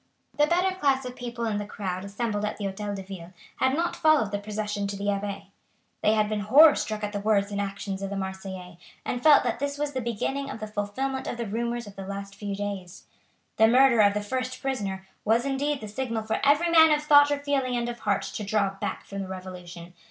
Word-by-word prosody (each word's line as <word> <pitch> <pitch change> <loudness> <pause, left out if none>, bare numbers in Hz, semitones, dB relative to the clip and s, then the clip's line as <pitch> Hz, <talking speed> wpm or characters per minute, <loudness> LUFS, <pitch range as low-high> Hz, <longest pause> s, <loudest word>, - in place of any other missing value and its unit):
The 295 0 +4
better 365 +3 +2
class 275 -6 +1
of 250 0 -6
people 240 -1 -5
in 215 -2 -1
the 205 - -3
crowd 185 -3 -4
assembled 205 +1 -3
at 210 - -2
the 210 - -6
Hotel 200 +1 -3
de 195 - -6
Ville 185 -2 -9 0.2
had 260 +1 +2
not 340 +2 -1
followed 310 -10 +3
the 205 - -1
procession 210 -1 -3
to 200 - -4
the 200 +1 -2
Abbaye. 200 0 -4 0.5
They 215 - +4
had 215 -1 +2
been 215 0 -2
horror 290 +9 +7
struck 215 -4 -3
at 205 0 -3
the 205 - -2
words 205 -1 +1
and 200 0 -1
actions 195 -1 -4
of 195 - -3
the 200 - -4
Marseillais, 190 -2 -6 0.3
and 245 - -2
felt 300 0 +7
that 240 -1 -1
this 285 +1 -2
was 295 0 -2
the 260 - -2
beginning 270 +5 -2
of - - -6
the 215 - -4
fulfilment 215 +6 -3
of - - -3
the 235 - -3
rumours 235 +3 -2
of 205 -1 -12
the 195 -1 -7
last 200 0 -6
few 200 0 -5
days. 200 -3 -5 0.5
The 220 - +6
murder 250 0 +5
of 205 -1 +4
the 210 - 0
first 255 +4 -3
prisoner 195 -8 -3 0.2
was 230 +4 +2
indeed 280 +1 -1
the 215 - -6
signal 230 0 -3
for 220 0 -2
every 295 +5 +4
man 320 -1 +8
of 300 0 +2
thought 290 -1 +7
or 290 - +1
feeling 280 -3 -1
and 240 0 -1
of 240 0 -5
heart - - 0
to 215 - -5
draw 200 -1 +1
back 195 - -5
from 200 - -7
the 190 - -5
Revolution. 180 -2 -9
215 Hz, 235 wpm, -26 LUFS, 200-265 Hz, 0.5 s, man